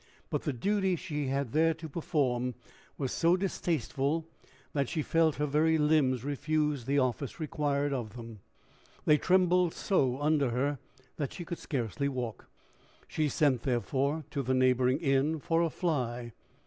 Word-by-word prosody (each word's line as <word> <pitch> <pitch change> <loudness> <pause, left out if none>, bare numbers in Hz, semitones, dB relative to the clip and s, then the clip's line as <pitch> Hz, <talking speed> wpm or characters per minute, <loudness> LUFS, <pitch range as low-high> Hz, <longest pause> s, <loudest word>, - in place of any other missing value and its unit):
But - - 0
the - - -1
duty 190 - +1
she 150 -5 -3
had 135 -2 -1
there 160 +2 +3
to 160 0 -8
perform 130 -6 -1 0.4
was 135 -3 -2
so 170 +2 +3
distasteful, 160 - -1 0.5
that 140 -3 0
she 155 - -1
felt 165 -1 +2
her 150 - 0
very 155 +3 +3
limbs 150 -5 +2
refuse 150 -1 -1
the 140 +2 +1
office 130 +2 -1
required 145 -2 -1
of 120 -4 -4
them. 115 -3 -9 0.7
They 150 0 +5
trembled 180 -2 +3
so 135 -9 +1
under 145 -2 +2
her 135 +3 -1 0.4
that 145 -4 -3
she 175 - -7
could 170 - -5
scarcely 130 - -2
walk. 125 -5 -5 0.6
She 155 -2 0
sent, 140 -5 +2
therefore, 140 +5 0
to 140 - -1
the 130 0 0
neighboring 130 0 +3
inn 145 +1 +1
for 165 +3 +1
a 170 - +2
fly. 125 -9 -2
145 Hz, 155 wpm, -30 LUFS, 130-160 Hz, 0.7 s, They